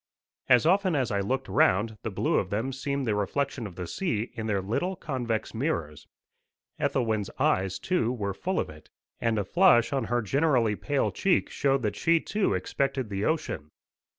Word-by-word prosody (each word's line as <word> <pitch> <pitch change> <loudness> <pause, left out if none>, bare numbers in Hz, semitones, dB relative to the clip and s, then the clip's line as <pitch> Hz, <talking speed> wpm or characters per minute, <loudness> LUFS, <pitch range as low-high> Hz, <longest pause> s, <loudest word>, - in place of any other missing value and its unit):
As 125 +2 +6
often 185 0 +3
as 130 -5 0
I 100 - +1
looked 130 +7 -1
round, 100 +3 +2
the 110 - -3
blue 95 - 0
of 95 - -3
them 115 +7 -2
seemed 140 +1 -2
the 110 - +1
reflection 120 +4 -1
of 90 - -12
the 90 - -5
sea 115 - -2
in 115 -2 -4
their 100 -2 +1
little 120 - -1
convex 125 -9 -3
mirrors. 110 - -3 0.7
Ethelwyn's 110 -5 0
eyes, 95 0 +1
too, 120 - 0
were 100 -5 -2
full 185 - -2
of - - -1
it, 75 0 -14 0.3
and 115 -2 +1
a 105 - +1
flush 155 - +4
on 135 -4 0
her 120 +1 0
generally 125 -3 +2
pale 145 +5 0
cheek 190 -2 +1
showed 135 -2 +1
that 105 - -1
she 170 -1 +3
too 205 +4 0
expected 135 -4 -1
the 100 +1 -1
ocean. 155 - -2
120 Hz, 180 wpm, -27 LUFS, 105-140 Hz, 0.7 s, As